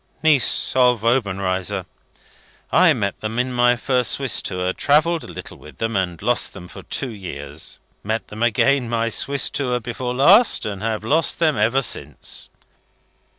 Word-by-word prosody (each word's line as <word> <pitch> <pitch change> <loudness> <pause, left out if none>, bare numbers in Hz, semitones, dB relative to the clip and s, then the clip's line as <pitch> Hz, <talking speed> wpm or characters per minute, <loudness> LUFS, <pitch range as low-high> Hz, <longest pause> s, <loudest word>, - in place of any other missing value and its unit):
"Niece 150 -6 +2
of 125 -3 +3
Obenreizer. 95 -5 0 0.9
(I 180 -1 +5
met 100 -8 -2
them 110 +1 -4
in 125 +1 -1
my 120 0 +3
first 125 0 0
Swiss 135 -3 +1
tour, 90 -1 -2
travelled 155 - +2
a - - -10
little - - -9
with 75 - -14
them, 115 0 -2
and 90 -3 -1
lost 120 +2 +1
them 90 -2 -10
for - - -10
two 130 - -3
years; 75 -8 -7 0.2
met 110 +2 -3
them 105 +1 -8
again, 120 +2 +2
my 115 0 0
Swiss 140 +4 0
tour 125 -3 -1
before 125 +1 -4
last, 190 - +5
and 100 -3 -5
have 110 -1 -2
lost 155 +8 +1
them 160 -3 +2
ever 115 +6 +2
since.) - - -2
120 Hz, 160 wpm, -21 LUFS, 100-135 Hz, 0.9 s, I